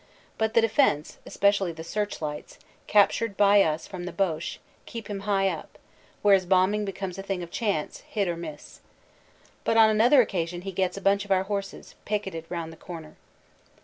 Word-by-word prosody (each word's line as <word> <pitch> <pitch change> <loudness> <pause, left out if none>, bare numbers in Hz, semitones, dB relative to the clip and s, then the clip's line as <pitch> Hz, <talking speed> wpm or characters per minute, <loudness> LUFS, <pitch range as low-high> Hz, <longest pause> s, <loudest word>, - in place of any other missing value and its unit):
But 220 0 0
the 230 - +7
defense, 220 - +1
especially 200 -3 +2
the 160 0 -8
search 205 0 -3
lights, 150 -1 -6 0.3
captured 205 +1 +3
by 200 0 +6
us 160 -2 0
from 180 -3 -7
the 180 - -5
Boche, 170 -5 -2 0.3
keep 230 -2 -7
him 205 -2 -4
high 195 -1 +1
up, - - -5 0.5
where 205 -1 +6
his 190 -2 +3
bombing 195 +3 +3
becomes 195 -1 -5
a - - -2
thing 195 -2 -3
of 170 - -9
chance, 200 -9 -2
hit 205 -3 0
or 170 - -1
miss. 160 -3 -9 0.8
But 225 - +1
on 220 -1 +7
another 235 +6 +5
occasion 175 -6 0
he 195 - -4
gets 185 0 -1
a - - -6
bunch 195 0 +3
of 205 - -13
our 190 -1 +3
horses, 200 0 -5
picketed 195 -6 -3
round 165 -2 -4
the - - -15
corner. 160 -3 -9
195 Hz, 185 wpm, -26 LUFS, 175-205 Hz, 0.8 s, the